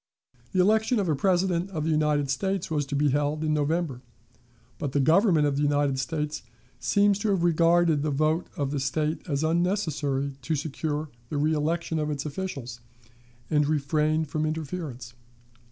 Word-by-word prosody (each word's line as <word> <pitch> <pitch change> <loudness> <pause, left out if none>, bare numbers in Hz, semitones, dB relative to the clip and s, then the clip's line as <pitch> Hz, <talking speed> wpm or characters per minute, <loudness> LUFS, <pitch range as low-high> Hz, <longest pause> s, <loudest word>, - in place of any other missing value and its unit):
The 185 - 0
election 220 +4 +3
of 195 - 0
a 155 - +2
President 180 +2 +1
of 160 -6 -3
the 160 - 0
United 150 -2 +1
States 190 +5 -2
was 145 -3 0
to 140 - -3
be 145 +1 +2
held 145 +2 0
in 155 -1 +1
November, 150 -3 -1 0.8
but 145 -5 -3
the 145 - +2
Government 160 - +4
of 140 -1 0
the - - 0
United 145 -2 +1
States 150 +2 -3 0.4
seems 200 - +3
to 215 - -1
have 190 -4 +1
regarded 170 -2 +3
the 155 - 0
vote 155 +4 +1
of 140 -2 -1
the 145 - -1
State 150 +3 -1
as 140 0 0
unnecessary 155 -6 0
to 155 +5 -1
secure 150 +1 -3 0.2
the 150 - -3
reelection 155 +2 0
of 150 0 -1
its 145 -1 -3
officials, 140 -7 -5 0.7
and 150 -2 +3
refrained 155 +1 +1
from 155 +2 -2
interference. 155 -6 -5
155 Hz, 170 wpm, -26 LUFS, 145-170 Hz, 0.8 s, Government